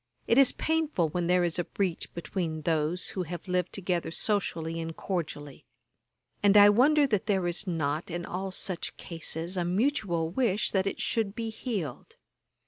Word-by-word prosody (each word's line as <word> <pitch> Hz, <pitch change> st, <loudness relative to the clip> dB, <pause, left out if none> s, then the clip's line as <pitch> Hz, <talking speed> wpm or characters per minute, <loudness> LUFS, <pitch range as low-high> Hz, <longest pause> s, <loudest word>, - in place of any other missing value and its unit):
It 235 Hz, -, +4 dB
is 275 Hz, -, +7 dB
painful 315 Hz, -, 0 dB
when 175 Hz, +2 st, -1 dB
there 180 Hz, 0 st, +3 dB
is 175 Hz, 0 st, 0 dB
a -, -, +1 dB
breach 185 Hz, -1 st, -3 dB
between 165 Hz, -2 st, -3 dB
those 160 Hz, +2 st, 0 dB
who 190 Hz, -, -3 dB
have 175 Hz, 0 st, -6 dB
lived 180 Hz, -1 st, 0 dB
together 180 Hz, -4 st, -2 dB
socially 165 Hz, -4 st, -1 dB
and 165 Hz, 0 st, -5 dB
cordially; 150 Hz, -6 st, -4 dB, 0.8 s
and 205 Hz, 0 st, +5 dB
I 205 Hz, 0 st, +9 dB
wonder 285 Hz, +8 st, +5 dB
that 215 Hz, -6 st, 0 dB
there 190 Hz, -4 st, +1 dB
is 175 Hz, +4 st, -2 dB
not, 155 Hz, -2 st, -1 dB
in 175 Hz, 0 st, -4 dB
all 190 Hz, +2 st, -4 dB
such 185 Hz, -1 st, -2 dB
cases, 165 Hz, +1 st, -3 dB
a 180 Hz, -, +1 dB
mutual 180 Hz, -, 0 dB
wish 215 Hz, -2 st, +1 dB
that 190 Hz, 0 st, +1 dB
it -, -, -3 dB
should 220 Hz, -3 st, -1 dB
be 225 Hz, -1 st, -3 dB
healed. 205 Hz, -, -5 dB
180 Hz, 170 wpm, -28 LUFS, 165-205 Hz, 0.8 s, I